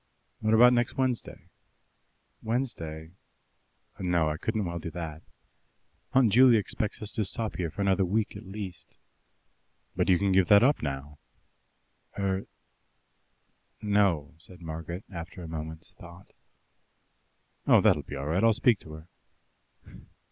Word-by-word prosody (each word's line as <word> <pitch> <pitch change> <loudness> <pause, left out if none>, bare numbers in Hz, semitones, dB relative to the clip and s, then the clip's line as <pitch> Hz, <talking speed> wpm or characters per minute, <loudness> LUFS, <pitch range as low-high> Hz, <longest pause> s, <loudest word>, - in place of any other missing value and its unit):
"What 110 +1 +2
about 125 +2 +7
next 120 -1 0
Wednesday?" 130 -3 -2 1.0
"Wednesday? 85 -10 -3 0.9
No, 85 -4 +1
I 75 - -4
couldn't 110 +3 -2
well 85 0 -4
do 85 - -6
that. 80 -2 -6 0.9
Aunt 130 -5 +4
Juley 125 +1 +7
expects 105 +2 -3
us 105 - -3
to 110 - -1
stop 110 +3 -2
here 85 -3 -2
another 100 -1 +2
week 100 +4 -1
at - - -7
least." 95 -2 -8 1.0
"But - - 0
you 90 - +6
can 100 +2 +1
give 95 -1 +4
that 100 +1 +7
up 140 +3 +3
now." 70 0 -5 1.0
"Er 95 -1 -1 1.3
no," 100 -8 +1
said 90 +2 -9
Margaret, 85 +2 -6
after 85 0 -8
a - - -7
moment's 80 0 -7
thought. - - -15 1.3
"Oh, - - +7
that'll - - +4
be - - -8
all 70 0 -5
right. 85 +7 0
I'll 115 -1 +5
speak 115 -4 +3
to 75 - -11
her." 80 +1 -11
95 Hz, 135 wpm, -28 LUFS, 80-110 Hz, 1.3 s, about